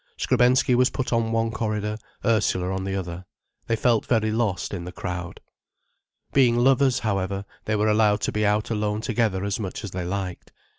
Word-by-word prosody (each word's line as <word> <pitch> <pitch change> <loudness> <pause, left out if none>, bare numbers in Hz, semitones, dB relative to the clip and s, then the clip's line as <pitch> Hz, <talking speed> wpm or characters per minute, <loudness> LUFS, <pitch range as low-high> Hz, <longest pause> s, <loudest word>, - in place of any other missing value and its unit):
Skrebensky 125 0 +3
was 125 +1 +4
put 130 -2 -3
on 115 -1 +1
one 115 0 +1
corridor, 105 -1 -2 0.3
Ursula 100 -5 +1
on 95 0 -3
the 95 0 -2
other. 90 -1 -5 0.4
They 115 - +2
felt 115 -1 +1
very 110 -3 +2
lost, 105 -5 -1
in 90 -3 -4
the 90 - -7
crowd. 90 -1 -6 0.9
Being 125 -4 +4
lovers, 130 +1 +4
however, 100 -1 -1 0.2
they 110 - 0
were 105 +1 +1
allowed 105 -1 +3
to - - 0
be 105 - -1
out 105 +2 +1
alone 105 -1 -1
together 110 -5 0
as 100 +2 -2
much 95 -4 -5
as 100 - -5
they 90 -1 -4
liked. 90 0 -4
105 Hz, 185 wpm, -24 LUFS, 95-115 Hz, 0.9 s, was